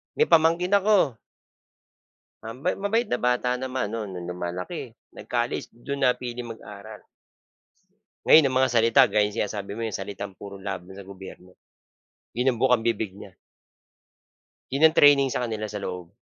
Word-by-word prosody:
May 460 - +2
pamangkin 165 +3 +3
ako 195 - +2 1.3
ah, 115 - -6
ma 180 - +2
mabait 225 +3 +1
na 125 - 0
bata 125 0 0
naman 130 -3 -3
no'n, 110 -2 -5
no'ng 90 -1 -7
lumalaki. 90 0 -5 0.2
Nag-college, - - -3
do'n 140 +4 -6
napiling 125 -1 -2
mag-aral. 105 0 -12 1.2
Ngayon 155 -2 +7
ang 130 - -4
mga 130 -1 +2
salita, 115 -1 +5
gaya 105 -1 +2
ng 105 - -10
sinasabi 100 -2 -3
mo, 115 - -3
yung 110 - -4
salitang 100 0 -6
puro 100 +1 -10
laban 95 -1 -7
sa 100 - -10
gobyerno, 95 -1 -12 0.8
'yon 125 +3 +2
ang 115 - -9
bukang-bibig 115 -5 +1
niya. 100 0 -12 1.4
'Yon 140 +4 0
ang 160 0 +6
training 140 -2 +6
sa - - -2
kanila 110 -1 -4
sa 105 - -5
loob. 90 -3 -6
115 Hz, 150 wpm, -25 LUFS, 100-130 Hz, 1.4 s, Ngayon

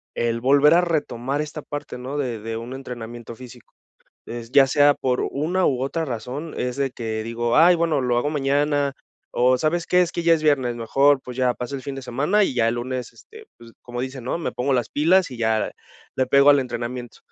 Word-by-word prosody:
el 115 0 -1
volver 140 +4 +5
a 170 - +6
retomar 145 -5 -2
esta 150 0 -6
parte, 145 -2 -7
¿no?, 130 +3 -6
de 125 -6 -2
de 115 +1 -5
un 115 +3 -7
entrenamiento 120 -3 -8
físico. 125 0 -14 0.5
Es 115 0 -7
ya 140 -1 +6
sea 145 +2 +4
por 125 -2 -1
una, 175 +6 0
u 130 -2 0
otra 160 +5 -2
razón, 135 +4 -5
es 125 0 -2
de 140 -1 -1
que 110 -3 -4
digo: 115 +1 -1
"Ay 170 +3 +7
bueno, 165 -4 +1
lo 120 -1 +1
hago 135 - 0
mañana, 145 0 +1 0.4
o 125 +1 +3
¿sabes 160 +5 -1
qué?, 180 0 +4
es 175 - -2
que 170 - -3
ya 165 0 +5
es 160 - -3
viernes, 135 -6 +1
mejor, 135 +4 +3
pues 125 0 -9
ya 125 -1 +2
pasa 125 +3 -6
el 135 - -5
fin 140 +1 -5
de 135 - -7
semana, 145 - +1
y - - -1
ya 115 -2 +2
el 115 - 0
lunes, 125 +1 -4
este, 440 0 -15
pues, 115 0 -15
como 120 0 -5
dicen 130 -1 -6
no 125 - -2
me 170 - -3
pongo 135 +2 0
las 120 -3 -1
pilas, 170 +3 +3
y 125 - -9
ya 110 -1 0 0.4
le 130 - +1
pego 140 +2 +6
al 145 -1 +5
entrenamiento". 120 -1 -5
130 Hz, 220 wpm, -22 LUFS, 120-145 Hz, 0.5 s, Ay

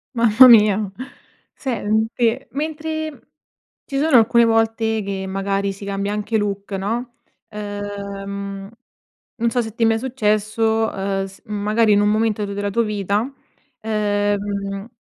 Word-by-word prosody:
mamma 235 +2 +7
mia! 210 -3 +5 0.6
Sente, 230 0 -1
mentre 315 +1 -4 0.6
ci 275 - -5
sono 300 -3 +4
alcune 235 +1 +5
volte, 225 -1 +1
che 195 -1 -4
magari 195 +1 -1
si 200 +1 -10
cambia 200 +1 -2
anche 210 +1 -2
look, 200 -1 -3
no, 230 +6 -3 0.4
uhm, 200 -1 -6 0.7
non 235 0 0
so 245 +1 +1
se 220 -1 -7
ti 230 - +1
è - - +5
mai 225 0 +3
successo, 220 -2 0
uhm, 195 0 -2
s 195 0 -12
magari 210 +1 +1
in 205 - +4
un 205 - +3
momento 215 -1 +1
tuo 200 - -5
della 205 0 -2
tua 235 +4 +1
vita, 205 -1 0 0.6
uhm, 205 -1 -1
210 Hz, 135 wpm, -20 LUFS, 200-225 Hz, 0.7 s, mamma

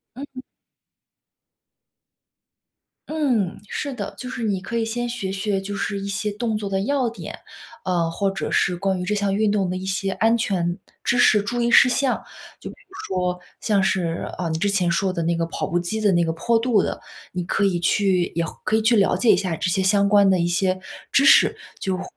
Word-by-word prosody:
嗯。 265 -1 -9 2.7
嗯， 245 - 0
是 280 +5 -4
的。 250 - -6
就 250 - -6
是 250 -2 -5
你 200 -4 -1
可 230 +4 -4
以 225 - 0
先 240 +2 -3
学 235 -5 -4
学， 195 +1 -1
就 200 +1 -5
是 200 0 -2
一 195 - -5
些 210 +2 -2
动 220 +1 -2
作 205 -2 -4
的 195 -1 0
要 265 0 0
点， 230 - -8 0.5
呃， 175 -3 0
或 195 +4 -1
者 195 - -4
是 180 -2 +1
关 190 +1 -1
于 180 - -4
这 195 +4 -1
项 200 -1 0
运 215 0 +2
动 200 -3 0
的 180 - -2
一 185 +1 -5
些 195 0 -1
安 225 +3 +2
全 180 -5 -1 0.3
知 240 - +1
识、 215 -3 +5
注 240 +4 -3
意 235 - +1
事 245 - +7
项。 265 +1 0 0.4
就 - - -7
比 - - -11
如 380 - -23 0.2
说， 180 0 -1 0.2
像 205 -3 +1
是， 170 -3 -1
啊， 175 - -2
你 160 -1 -2
之 200 +5 0
前 190 -3 +2
说 185 +3 +1
的 175 -2 -3
那 170 +1 +1
个 165 0 -1
跑 - - -4
步 175 - -1
机 175 +5 -1
的 205 -3 +2
那 175 -1 +3
个 165 - 0
坡 225 +9 +1
度 225 -3 +2
的， - - -4 0.3
你 180 0 -2
可 195 +3 0
以 190 -3 +1
去 180 +1 +1
也 170 0 0 0.2
可 220 - +1
以 - - +1
去 230 +2 +3
了 200 -3 +3
解 240 - +2
一 - - +4
下， 185 -2 -2
这 175 - -1
些 190 +2 +1
相 200 +1 +3
关 200 -1 +5
的 185 -1 +3
一 170 - +1
些 185 +1 0 0.3
知 275 - +4
识， - - +6 0.2
就 190 -1 -1
会 190 - -5
200 Hz, 240 characters per minute, -22 LUFS, 180-225 Hz, 2.7 s, 事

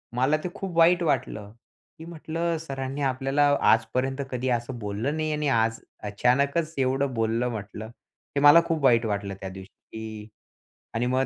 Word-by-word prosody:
मला 135 +5 +2
ते 180 - -2
खूप 185 -4 -5
वाईट 175 +1 +5
वाटलं. 110 -8 -1 0.5
मी 160 - -9
म्हंटलं 165 0 -3
सरांनी 135 -2 -5
आपल्याला 135 +1 0 0.3
आजपर्यंत 130 +4 0
कधी 125 +1 -2
असं 120 +1 -2
बोललं 110 +9 -3
नाही 155 0 -1
आणि 150 0 -1
आज 115 -2 +1 0.3
अचानकच 140 +9 +1
एवढं 135 0 0
बोललं 115 +1 0
म्हंटलं, 110 -1 -6
हे 120 +4 -9
मला 145 +3 +8
खूप 160 -3 -2
वाईट 120 -3 +4
वाटलं 100 -1 -3
त्या 95 - -5
दिवशी. 95 0 -10 0.2
की 110 -1 -7 0.7
आणि 115 +2 0
मग, 130 +2 +1
130 Hz, 160 wpm, -26 LUFS, 115-150 Hz, 0.7 s, मला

